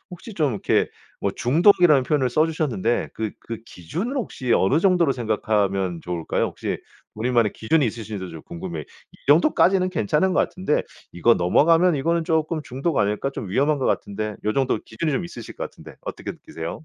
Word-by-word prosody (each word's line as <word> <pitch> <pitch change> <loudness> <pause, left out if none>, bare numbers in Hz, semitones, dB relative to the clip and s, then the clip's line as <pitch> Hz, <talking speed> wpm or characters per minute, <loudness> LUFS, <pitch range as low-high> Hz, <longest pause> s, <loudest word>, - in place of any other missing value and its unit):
혹시 180 +6 -9
좀 150 -7 +1
이렇게 105 - +1 0.3
뭐 - - 0
중독이라는 160 +1 +5
표현을 135 -3 +1
써 155 +6 +3
주셨는데 125 - -1
그 110 -1 -2
그 115 -1 -6
기준은 175 - -5
혹시 130 - -2
어느 115 +11 +3
정도로 175 -6 +3
생각하면 100 -6 0
좋을까요? 85 -2 -1
혹시 - - -4 0.4
우리만의 115 -1 +1
기준이 145 +6 +1
있으신지도 105 -4 -5
좀 80 -2 -9
궁금해요. 85 -2 -6
'이 - - -21
정도까지는 185 - +4
괜찮은 165 - +1
것 - - +3
같은데 185 -5 0 0.3
이거 115 +7 +4
넘어가면 165 - +4
이거는 165 +4 0
쪼끔 160 -1 0
중독 135 +5 -2
아닐까? 105 +6 0
좀 115 -7 -6
위험한 145 +8 +2
것 130 - 0
같은데?' 105 +1 -2
요 105 - +1
정도 130 -2 +1
기준이 150 +7 -2
좀 175 - -1
있으실 120 -10 -9
것 - - -3
같은데 - - -11
어떻게 - - -6
느끼세요? 80 - -8
130 Hz, 415 characters per minute, -23 LUFS, 105-160 Hz, 0.4 s, 중독이라는